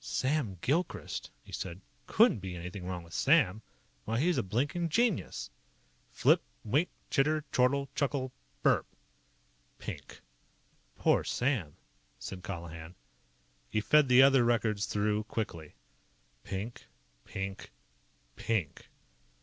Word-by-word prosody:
"Sam 110 - 0
Gilchrist," 165 +6 -1
he - - -15
said. 90 -1 -5 0.3
"Couldn't - - +5
be 95 -1 -6
anything 90 +2 -6
wrong 90 -2 -4
with 85 0 -14
Sam. 125 - +4 0.4
Why, 115 +1 0
he's 175 +4 +2
a - - +3
blinkin' 145 - -1
genius!" 230 +2 0 0.6
Flip. - - +4 0.2
Wink. 145 - +2 0.2
Chitter. 155 +2 +2
Chortle. 140 +2 +3
Chuckle. 140 -3 -1 0.3
BURP! - - +4 0.9
Pink. - - -8 0.7
"Poor - - +3
Sam!" 120 - -1 0.4
said 90 +9 -7
Colihan. 85 -2 -7 0.7
He 110 - +1
fed 150 +6 +5
the 125 +1 +8
other 135 -2 +6
records 110 -3 +1
through 105 +1 0
quickly. 85 - -4 0.7
Pink. 100 +5 -5 0.4
Pink. 95 0 -5 0.7
PINK. 100 -11 -2
110 Hz, 110 wpm, -31 LUFS, 95-140 Hz, 0.9 s, the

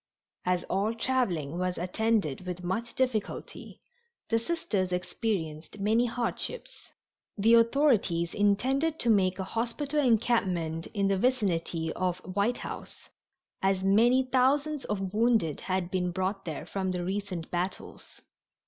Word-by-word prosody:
As 180 -1 +1
all 210 +4 -1
traveling 180 - -1
was 180 0 -1
attended 185 -3 0
with 180 0 -5
much 225 +7 -3
difficulty, 250 -5 -3 0.5
the 230 - +3
Sisters 220 - -1
experienced 180 -3 -3
many 220 +4 +2
hardships. 240 - -4 0.5
The 220 +3 +4
authorities 230 - +3
intended 265 +10 +2
to 235 - +2
make 185 -3 +3
a 190 - -2
hospital 245 +8 -2
encampment 190 - +1
in 200 -1 +2
the 195 -1 +1
vicinity 175 -9 0
of 180 -1 -1 0.2
White 205 +5 +1
House, - - -9 0.5
as 190 -1 +1
many 235 +7 +5
thousands 275 +3 +2
of 195 -2 -3
wounded 220 - +2
had 185 -1 -2
been 180 -1 0
brought 190 +2 -2
there 155 -2 -5
from 190 +1 -2
the 180 -1 -2
recent 190 -3 -4
battles. 180 +2 -5
200 Hz, 130 wpm, -29 LUFS, 180-235 Hz, 0.5 s, many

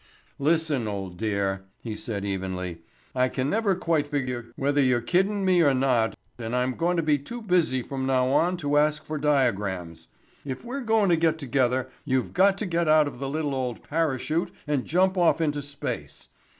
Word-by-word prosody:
"Listen, 150 -5 +1
old 95 -3 -4
dear," 100 -2 -1 0.2
he 110 -3 -4
said 105 -2 -4
evenly, 90 -3 -4 0.3
"I 130 0 +2
can 130 +2 -1
never 210 -3 +2
quite 165 -4 0
figure 130 -5 -3
whether 145 +1 +1
you're 125 -2 +3
kiddin' 190 - +1
me 180 -2 +4
or 140 -4 +4
not 125 -4 +2 0.2
and 115 +1 -3
I'm 125 +1 +1
going 175 +5 0
to 165 - +1
be 150 -2 +2
too 235 - -7
busy 175 - +1
from 135 0 -4
now 130 -1 +2
on 175 +6 +2
to 145 +1 +2
ask 150 0 +1
for 155 -1 -4
diagrams. 100 - 0 0.4
If 135 - -6
we're 265 +4 -4
goin' 220 -4 +2
to 170 - +4
get 160 -1 +2
together 130 -2 0 0.2
you've 130 -3 -1
got 195 +1 +4
to 210 - -3
get 170 -2 0
out 155 0 +5
the 135 0 -3
little 150 -1 -2
old 125 -3 -3
parachute 155 +1 0 0.2
and 145 -4 -1
jump 185 +3 +2
off 170 -1 +4
into 145 -3 0
space. 145 0 -6
140 Hz, 185 wpm, -26 LUFS, 125-165 Hz, 0.4 s, out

